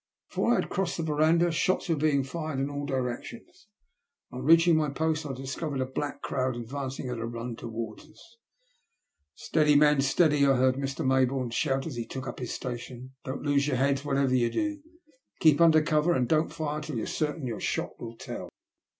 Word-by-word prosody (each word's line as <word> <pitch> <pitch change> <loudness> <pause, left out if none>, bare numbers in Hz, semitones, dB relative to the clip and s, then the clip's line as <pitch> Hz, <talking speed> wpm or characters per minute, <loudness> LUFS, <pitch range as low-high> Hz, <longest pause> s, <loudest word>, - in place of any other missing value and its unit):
Before 240 - +1
I - - +4
had - - -1
crossed 190 -2 -1
the 165 - -2
verandah, 160 +3 +3
shots 170 +3 0
were 165 - +2
being 145 -2 +2
fired 155 0 -4
in 140 +1 -1
all 145 0 -4
directions, 130 - -5 0.6
and 125 - -6
on - - -6
reach 165 +1 +7
ing 170 - +6
my 155 -1 +1
post, 155 +1 -1
I 135 - -4
discovered 135 +2 -4
a 130 - +1
black 140 +2 -4
crowd 130 -2 -1
advancing 130 +3 -5
at 125 -2 -4
a 115 - -3
run 120 0 -5
towards 115 +2 -7
us. 225 +8 -19 1.0
Steady 155 -1 +2
men, 150 -1 +5
steady," 145 +1 +3
I 135 -1 +5
heard 130 0 +4
Mr. 135 0 -3
Mayboume 130 -2 +1
shout 135 0 0
as 150 -7 -5
he 115 -1 -4
took 130 +2 -6
up 120 - -6
his 125 -2 -4
station. 125 +1 -6
'* - - -57
Don*t 135 +3 -5
lose 145 0 +2
your 130 - 0
heads 135 +1 +1
whatever 135 -2 +1
you 120 -2 +3
do. 310 - -2 0.6
Keep 155 -1 +5
under 160 -2 +6
cover, 155 +2 +2
and 125 -1 +1
don't 155 +4 +2
fire 150 -1 -3
till 150 -4 -5
you're 110 - -2
certain 150 -1 -2
your 115 -4 -4
shot - - -3
will 115 -1 -8
tell." - - -7
140 Hz, 205 wpm, -28 LUFS, 130-155 Hz, 1.0 s, reach